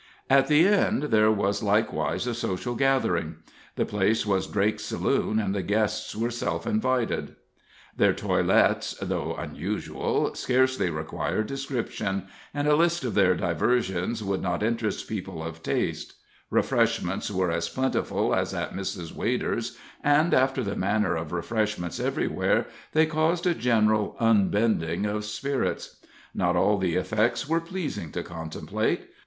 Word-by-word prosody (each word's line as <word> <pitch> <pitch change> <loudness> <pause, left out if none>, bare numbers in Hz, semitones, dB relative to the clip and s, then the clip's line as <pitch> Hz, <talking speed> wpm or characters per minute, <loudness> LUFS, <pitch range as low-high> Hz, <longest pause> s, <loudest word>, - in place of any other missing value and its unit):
At 135 0 +5
the 155 +5 +5
End 200 -8 +2
there 110 0 +5
was 100 0 0
likewise 105 +3 0
a 125 - -1
social 115 +1 -2
gathering. 120 - +1 0.4
The - - 0
place 105 +2 +1
was 95 -2 +1
Drake's 105 +1 0
saloon, 110 - 0
and 100 -3 0
the 100 - -1
guests 105 +3 -1
were 115 +2 -1
self 85 -8 -2
invited. 125 +2 0 0.6
Their - - +4
toilets, - - +2
though - - -2
unusual, - - -2
scarcely 130 -6 +1
require 80 +6 -2
description, 120 -7 -3 0.3
and 145 0 -1
a 150 - +5
list 170 0 +2
of 125 - -2
their 95 -3 +4
diversions 95 +4 0
would 100 -1 -1
not 90 +2 -1
interest 115 -1 -1
people 95 -6 -5
of 80 0 -7
taste - - -2 0.3
Refreshments 90 +4 +1
were 95 -3 0
as 85 0 -1
plentiful 130 0 0
as - - 0
at - - -3
Mrs. 95 -3 -5
Wader's, - - -2 0.3
and, 150 +3 +4
after 130 0 +3
the 100 -2 -3
manner 100 -2 +1
of 80 -1 -4
refreshments 105 0 -2
everywhere, - - 0 0.3
they 160 0 +5
caused 160 +3 0
a 175 - +3
general 110 -6 +2
unbending 105 -5 +2
of 105 0 -2
spirits. 130 +6 -3 0.4
Not - - +1
all 105 -1 +3
the 90 -3 0
effects 110 +6 0
were 165 +2 +1
pleasing 165 - -5
to - - -3
contemplate. 80 -1 -3
105 Hz, 140 wpm, -26 LUFS, 95-130 Hz, 0.6 s, At